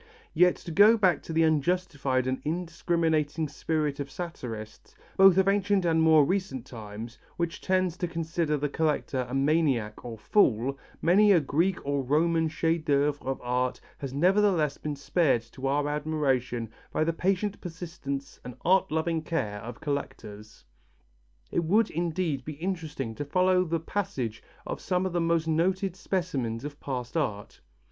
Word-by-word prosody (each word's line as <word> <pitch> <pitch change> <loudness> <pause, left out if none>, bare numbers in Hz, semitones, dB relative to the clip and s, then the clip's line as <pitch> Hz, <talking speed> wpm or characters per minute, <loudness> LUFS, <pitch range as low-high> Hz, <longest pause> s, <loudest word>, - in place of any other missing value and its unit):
Yet, 180 0 +5
to 170 - -9
go 210 +7 +6
back 185 -7 +3
to - - -8
the 165 0 +3
unjustified 150 -4 +1
and 130 0 -2
indiscriminating 165 -2 0
spirit 150 0 -2
of 140 0 -4
satirists, 120 -11 -7 0.2
both 195 -1 +7
of 190 0 +4
ancient 200 -1 +2
and 160 -1 +3
more 160 -2 +6
recent 160 -8 -2
times, 110 -1 -9 0.2
which 170 +2 -2
tends 185 -2 +1
to 180 - -2
consider 165 -2 -1
the 145 +1 -1
collector 145 -4 -1
a 130 - -3
maniac 135 -7 +1
or 115 -2 -7
fool, 125 - +2 0.3
many 205 +5 +5
a 180 - +6
Greek 165 +6 +1
and 140 -2 -1
Roman 165 +2 +3
chef 165 +1 0
d'œuvre 145 -1 +1
of 135 0 -3
art 125 +1 -1 0.2
has 135 -2 -5
nevertheless 175 -1 +2
been 150 -1 -4
spared 140 -4 +1
to 135 0 -4
our 145 +2 +1
admiration 135 -6 -1 0.2
by - - +1
the 165 +1 0
patient 195 +4 -1
persistence 165 -6 -6
and 125 -1 -8
art 190 +1 +4
loving 160 +1 0
care 110 -11 -2
of 115 +1 -9
collectors. 110 -7 -6 0.9
It 170 - +1
would, 210 +7 +2
indeed, 165 -4 -1
be 155 - -6
interesting 155 -7 -4
to 145 - -4
follow 185 +4 +3
the 165 0 -1
passage 160 - -3 0.2
of - - -5
some 180 0 0
of 185 - -2
the 175 - +1
most 165 -1 +1
noted 185 +3 +1
specimens 145 - -2
of 145 0 -7
past 125 -2 -5
art. 105 -10 -3
155 Hz, 160 wpm, -28 LUFS, 135-175 Hz, 0.9 s, both